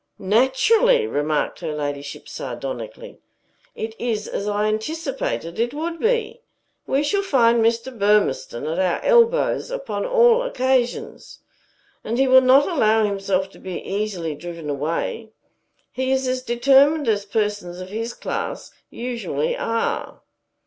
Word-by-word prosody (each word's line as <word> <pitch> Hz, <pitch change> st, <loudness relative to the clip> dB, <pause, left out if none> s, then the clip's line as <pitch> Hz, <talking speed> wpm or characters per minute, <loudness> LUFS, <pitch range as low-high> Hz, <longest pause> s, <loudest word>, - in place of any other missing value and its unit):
"Naturally!" 335 Hz, -, +3 dB
remarked 150 Hz, -, -1 dB
her 160 Hz, -3 st, -4 dB
ladyship 145 Hz, -1 st, -5 dB
sardonically. -, -, -7 dB, 0.6 s
"It 220 Hz, 0 st, -5 dB
is 220 Hz, -3 st, -2 dB
as 200 Hz, -, -4 dB
I 205 Hz, 0 st, 0 dB
anticipated 220 Hz, -, -3 dB
it 240 Hz, +4 st, 0 dB
would 330 Hz, +2 st, -4 dB
be. 465 Hz, 0 st, 0 dB, 0.5 s
We 275 Hz, +2 st, +1 dB
shall 395 Hz, +7 st, +1 dB
find 235 Hz, -10 st, +3 dB
Mr. 230 Hz, +3 st, 0 dB
Burmistone 205 Hz, -, +1 dB
at 160 Hz, +3 st, -2 dB
our 185 Hz, -2 st, +1 dB
elbows 480 Hz, 0 st, +3 dB
upon -, -, -3 dB
all 485 Hz, -1 st, +5 dB
occasions. 260 Hz, -, -1 dB, 0.6 s
And 230 Hz, +2 st, -2 dB
he 270 Hz, +1 st, +3 dB
will 260 Hz, 0 st, +7 dB
not 260 Hz, +2 st, +5 dB
allow 220 Hz, -, +3 dB
himself 195 Hz, -1 st, -1 dB
to -, -, -16 dB
be 185 Hz, -2 st, -6 dB
easily 195 Hz, -6 st, -3 dB
driven 165 Hz, 0 st, -6 dB
away. 165 Hz, +10 st, -3 dB, 0.6 s
He 260 Hz, +1 st, -2 dB
is 265 Hz, 0 st, +1 dB
as 255 Hz, 0 st, -1 dB
determined 275 Hz, +5 st, +3 dB
as 205 Hz, -2 st, +1 dB
persons 205 Hz, -4 st, -2 dB
of 185 Hz, 0 st, -8 dB
his 230 Hz, +3 st, -4 dB
class -, -, -5 dB, 0.2 s
usually 250 Hz, -, -3 dB
are." 230 Hz, -, -2 dB
235 Hz, 135 wpm, -22 LUFS, 200-290 Hz, 0.6 s, will